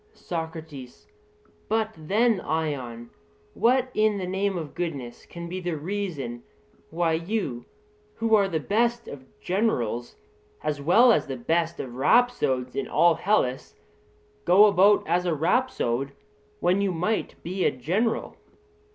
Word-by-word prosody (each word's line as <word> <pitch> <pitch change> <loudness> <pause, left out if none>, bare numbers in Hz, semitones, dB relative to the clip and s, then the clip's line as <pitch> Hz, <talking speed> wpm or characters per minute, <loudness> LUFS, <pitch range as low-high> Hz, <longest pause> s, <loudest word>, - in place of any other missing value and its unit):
SOCRATES: 160 -6 -7 0.6
But 220 0 0
then, 205 +7 +1
Ion, 130 -7 -3 0.4
what 255 +3 +2
in 215 -1 +2
the 190 - -3
name 190 +1 -1
of 155 -5 -6
goodness 140 -9 -5
can 170 0 -8
be 185 +2 -5
the 175 -3 -3
reason 150 -9 -4 0.5
why 165 0 0
you, 165 - -2 0.5
who 225 0 -1
are 205 -2 +5
the 165 -4 -1
best 235 +7 0
of 130 -2 -10
generals 125 - -1 0.5
as 145 -2 -2
well 225 - +6
as - - +2
the 135 -1 -4
best 165 +6 -1
of 125 -3 -6
rhapsodes 135 - +2
in 135 - -2
all 170 0 +4
Hellas, 160 -7 0 0.7
go 190 +4 +7
about 200 0 +4
as 175 +2 +1
a 165 - +1
rhapsode 140 - 0 0.5
when 180 +3 +2
you 200 -1 +1
might 180 +6 -2
be 185 +2 -2
a - - +4
general? 190 - -2
170 Hz, 135 wpm, -25 LUFS, 140-205 Hz, 0.7 s, go